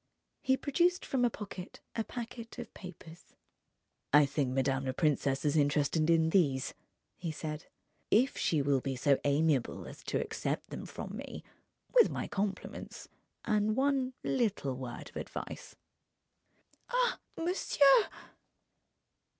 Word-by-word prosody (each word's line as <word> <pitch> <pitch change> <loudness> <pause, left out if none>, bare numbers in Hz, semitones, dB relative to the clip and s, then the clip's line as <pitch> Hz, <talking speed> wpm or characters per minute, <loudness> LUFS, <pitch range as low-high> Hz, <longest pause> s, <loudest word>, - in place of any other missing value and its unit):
He 265 -2 +3
produced 350 +7 +2
from 260 -2 0
a 245 - +5
pocket 200 -4 -8 0.2
a 225 - 0
packet 230 0 -7
of - - -7
papers. 175 -2 -11 0.9
"I 150 0 +7
think 140 -1 0
madame 135 +1 +1
la 130 - -1
princesse 140 -2 +1
is 145 0 +2
interested 150 +2 +2
in 160 -1 +4
these," 140 -9 +2 0.4
he 170 -2 -3
said. 155 +1 -5 0.4
"If 250 +6 +4
she 155 -4 +1
will 140 -2 +2
be 135 0 -2
so 135 +2 +3
amiable 145 -2 +1
as - - -10
to - - 0
accept 450 0 -3
them - - -6
from - - -6
me, - - -7 0.5
with 485 -2 +7
my - - -3
compliments 200 -1 -4 0.4
and 215 0 +2
one 265 -1 +1
little 205 - 0
word 125 -2 -6
of - - -8
advice...." - - -6 1.1
"Ah, - - +2 0.2
monsieur!" 330 0 +4
165 Hz, 135 wpm, -32 LUFS, -, 1.1 s, I